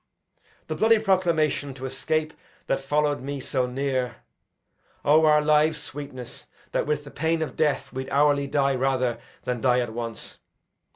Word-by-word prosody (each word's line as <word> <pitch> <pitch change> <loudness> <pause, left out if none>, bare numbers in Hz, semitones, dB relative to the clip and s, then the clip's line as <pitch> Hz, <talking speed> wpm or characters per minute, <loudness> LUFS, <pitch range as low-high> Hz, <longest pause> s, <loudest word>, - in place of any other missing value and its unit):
The - - -3
bloody 225 +1 +4
proclamation 170 -9 +1
to 135 0 -7
escape 155 +4 -1 0.3
That - - 0
follow'd 145 -1 0
me 140 +1 -4
so 130 -1 -1
near 130 -1 -1 0.9
(O, 155 +2 +6
our 150 0 +5
lives' 155 +1 +3
sweetness! 130 -3 -7 0.2
That - - 0
with 150 -1 0
the 140 - -11
pain 160 0 0
of 155 - -6
death 145 -3 0
would 130 0 -4
hourly 145 0 +3
die 140 -1 +2
Rather 130 -2 0 0.2
than 125 -2 -2
die 125 -1 +4
at 120 -3 -2
once!) 115 -1 -5
140 Hz, 155 wpm, -25 LUFS, 130-155 Hz, 0.9 s, O